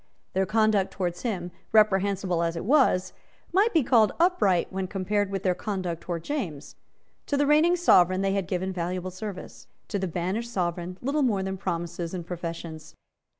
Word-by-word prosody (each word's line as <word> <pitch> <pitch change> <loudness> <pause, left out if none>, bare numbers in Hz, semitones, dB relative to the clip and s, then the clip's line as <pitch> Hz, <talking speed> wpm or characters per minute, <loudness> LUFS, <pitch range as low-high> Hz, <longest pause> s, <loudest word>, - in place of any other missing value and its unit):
Their 190 0 +1
conduct 215 -3 +2
towards 180 -2 -3
him, 185 -7 -3 0.2
reprehensible 195 -4 +3
as 170 0 0
it 165 - -4
was, 250 -8 +3 0.4
might 410 +5 +4
be 320 -7 +3
called 230 -3 +4
upright 330 - +2
when 190 0 -2
compared 200 +1 -1
with 195 -1 -3
their 185 - +3
conduct 185 -4 -4
towards 170 -2 -5
James. 175 - -4 0.5
To 285 - 0
the 290 - +3
reigning 305 +4 +4
Sovereign 185 - +4
they 195 0 +1
had 195 -3 -1
given 185 +1 -2
valuable 180 +1 -3
service; 185 0 -8 0.2
to 200 - -1
the 190 - -1
banished 185 +8 -3
Sovereign 175 -2 -2
little 285 +4 0
more 210 -8 +1
than 190 0 -3
promises 175 -1 -4
and 175 -2 -5
professions. 165 -2 -7
190 Hz, 170 wpm, -26 LUFS, 175-215 Hz, 0.5 s, might